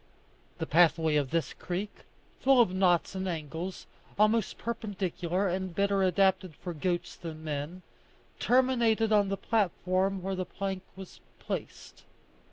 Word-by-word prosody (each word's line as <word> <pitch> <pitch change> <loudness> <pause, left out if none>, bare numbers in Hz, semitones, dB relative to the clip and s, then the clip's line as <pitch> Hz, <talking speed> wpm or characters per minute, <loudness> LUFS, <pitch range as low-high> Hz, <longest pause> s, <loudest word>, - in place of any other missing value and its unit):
The - - -2
pathway 160 -1 +4
of 145 -3 +1
this 165 0 -1
creek, 185 +4 -4 0.5
full 270 -1 +5
of 225 -6 +4
knots 185 -2 +2
and 190 0 -3
angles, 165 +3 -5 0.3
almost 215 +1 +2
perpendicular, 195 -5 -2
and 185 -1 -2
better 200 0 +2
adapted 190 -2 +2
for 175 +2 -6
goats 175 +2 -2
than 160 -2 -8
men, 155 +4 -4 0.6
terminated 235 -3 +3
on 205 -2 +4
the 195 - -1
platform 190 -3 0
where 195 +1 -2
the 185 -1 -2
plank 195 +1 -4
was 190 -1 -11 0.2
placed. - - -6
185 Hz, 135 wpm, -29 LUFS, 175-200 Hz, 0.6 s, full